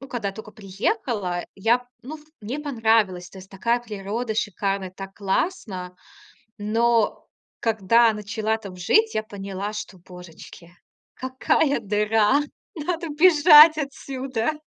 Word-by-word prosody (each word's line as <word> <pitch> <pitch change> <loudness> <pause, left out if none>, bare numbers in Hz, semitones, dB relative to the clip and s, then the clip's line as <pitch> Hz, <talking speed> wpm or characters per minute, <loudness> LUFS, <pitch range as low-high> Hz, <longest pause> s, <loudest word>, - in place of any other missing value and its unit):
ну, 270 - -11
когда 230 -6 -3
я - - -5
тока 220 0 -10
приехала, 200 - -3
я, 235 +5 +1 0.2
ну, 270 +6 -8
ф 300 - -19 0.2
мне 230 +7 -5
понравилось. 225 - +1
То 195 - -13
есть 190 0 -14
такая 235 +5 0
природа 220 +1 -4
шикарная, 195 -2 -2
так 195 0 -9
классно. 195 - -3 0.6
Но 225 +1 +1 0.3
когда 225 +1 +3
начала 215 +1 -2
там 200 -4 -10
жить, 435 - +2
я 215 - 0
поняла, 200 -1 -6
что, 210 -2 -7
божечки, 180 -1 -13 0.4
какая 260 +3 0
дыра, 210 +5 +2 0.3
надо 335 +1 -3
бежать 310 -1 +7
отсюда. 275 -1 -4
220 Hz, 125 wpm, -23 LUFS, 195-260 Hz, 0.6 s, бежать